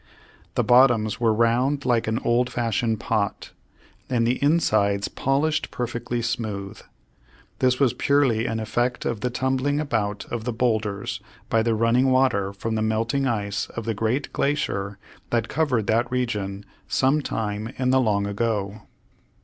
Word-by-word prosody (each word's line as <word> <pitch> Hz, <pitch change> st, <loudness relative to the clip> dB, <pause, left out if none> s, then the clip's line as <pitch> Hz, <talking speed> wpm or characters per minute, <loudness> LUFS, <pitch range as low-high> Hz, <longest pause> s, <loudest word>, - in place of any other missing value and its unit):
The -, -, +2 dB
bottoms 120 Hz, -4 st, +4 dB
were 115 Hz, -2 st, +3 dB
round 120 Hz, +6 st, +1 dB
like 120 Hz, -3 st, +2 dB
an 110 Hz, +1 st, 0 dB
old 120 Hz, +1 st, +2 dB
fashioned 115 Hz, -2 st, -1 dB
pot, 105 Hz, -3 st, -2 dB, 0.6 s
and 120 Hz, -3 st, +1 dB
the 120 Hz, +2 st, 0 dB
insides 105 Hz, -10 st, +2 dB
polished 150 Hz, +4 st, 0 dB
perfectly 120 Hz, 0 st, -3 dB
smooth. 105 Hz, -4 st, -4 dB, 0.8 s
This 125 Hz, 0 st, +2 dB
was 135 Hz, -5 st, +3 dB
purely 130 Hz, -6 st, +2 dB
an 115 Hz, 0 st, -2 dB
effect 120 Hz, +3 st, -1 dB
of 115 Hz, -3 st, -1 dB
the 125 Hz, -, 0 dB
tumbling 130 Hz, +3 st, 0 dB
about 105 Hz, -8 st, -2 dB
of 120 Hz, -2 st, -3 dB
the 125 Hz, +1 st, -2 dB
bowlders 110 Hz, -1 st, -1 dB, 0.3 s
by 115 Hz, -, +4 dB
the 115 Hz, 0 st, +1 dB
running 115 Hz, +4 st, +3 dB
water 130 Hz, -7 st, +2 dB
from 110 Hz, +3 st, -4 dB
the 110 Hz, -, 0 dB
melting 115 Hz, +5 st, 0 dB
ice 105 Hz, -3 st, -2 dB
of 115 Hz, -, -6 dB
the 115 Hz, -, 0 dB
great 115 Hz, +6 st, -1 dB
glacier 100 Hz, -9 st, -1 dB, 0.3 s
that 115 Hz, -2 st, 0 dB
covered 135 Hz, -9 st, +1 dB
that 115 Hz, +3 st, +1 dB
region 105 Hz, -6 st, -2 dB, 0.2 s
some 135 Hz, +3 st, +2 dB
time 110 Hz, -3 st, -3 dB
in 130 Hz, -1 st, +1 dB
the 130 Hz, 0 st, +4 dB
long 100 Hz, -4 st, +1 dB
ago. 105 Hz, -1 st, -2 dB
115 Hz, 150 wpm, -24 LUFS, 110-125 Hz, 0.8 s, bottoms